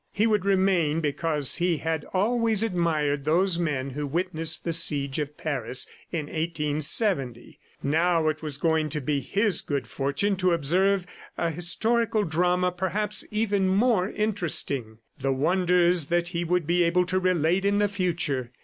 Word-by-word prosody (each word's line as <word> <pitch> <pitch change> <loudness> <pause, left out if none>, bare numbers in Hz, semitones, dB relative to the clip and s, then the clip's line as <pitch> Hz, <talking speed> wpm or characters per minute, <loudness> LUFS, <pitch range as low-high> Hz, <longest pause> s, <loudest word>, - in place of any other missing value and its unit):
He 210 - +1
would 210 -4 +1
remain 185 -5 +2
because 150 -1 0
he 175 -2 +1
had 160 +1 -3
always 225 +2 +1
admired 160 -8 0
those 170 +4 +2
men 140 -5 -2
who 145 +2 -4
witnessed 165 +1 -2
the 165 - -2
Siege 140 -3 +1
of 150 0 -4
Paris 130 -5 -1 0.3
in 160 -4 -2
1870. 150 - -1 0.2
Now 165 +3 +2
it 155 0 -1
was 150 -3 -3
going 160 0 +1
to 150 - -3
be 145 +1 -1
his 195 - +1
good 140 -4 -3
fortune 145 - -1
to 185 -1 +2
observe 180 +5 +2 0.3
an 165 -1 -1
historical 215 +6 0
drama, 180 +2 +1
perhaps 190 +4 -2
even 205 -3 0
more 200 0 +2
interesting. 165 - -1 0.2
The 135 0 0
wonders 175 +2 +2
that 170 +1 0
he 175 -1 -2
would 180 -1 0
be 175 +3 +2
able 175 +1 +2
to 185 +1 0
relate 180 0 +1
in 200 0 +2
the 205 0 +3
future! 170 -10 -2
170 Hz, 155 wpm, -26 LUFS, 150-190 Hz, 0.3 s, the